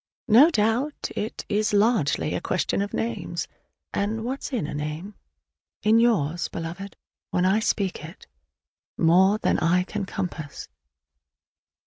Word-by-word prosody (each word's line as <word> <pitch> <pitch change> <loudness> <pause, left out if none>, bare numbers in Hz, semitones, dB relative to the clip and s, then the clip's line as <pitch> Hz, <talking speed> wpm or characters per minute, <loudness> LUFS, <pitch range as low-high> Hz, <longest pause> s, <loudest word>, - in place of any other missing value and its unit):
No 245 +9 +7
doubt 240 +3 0
it 215 - -4
is 210 0 0
largely 205 - +2
a - - -2
question 185 +2 0
of 200 - -3
names; 230 - -3 0.5
and 220 +3 -1
what's 265 +4 -4
in 240 - -1
a 150 - -5
name? 150 +7 -5 0.7
In 220 +2 +5
yours, 175 -9 +2
Beloved, 170 +4 -6 0.3
when 180 - +1
I 195 +3 +3
speak 200 -6 -1
it, 165 +4 -11 0.7
more 190 +5 +5
than - - +1
I 180 +2 +3
can 205 +1 -4
compass! 170 -7 -5
200 Hz, 130 wpm, -25 LUFS, 170-220 Hz, 0.7 s, No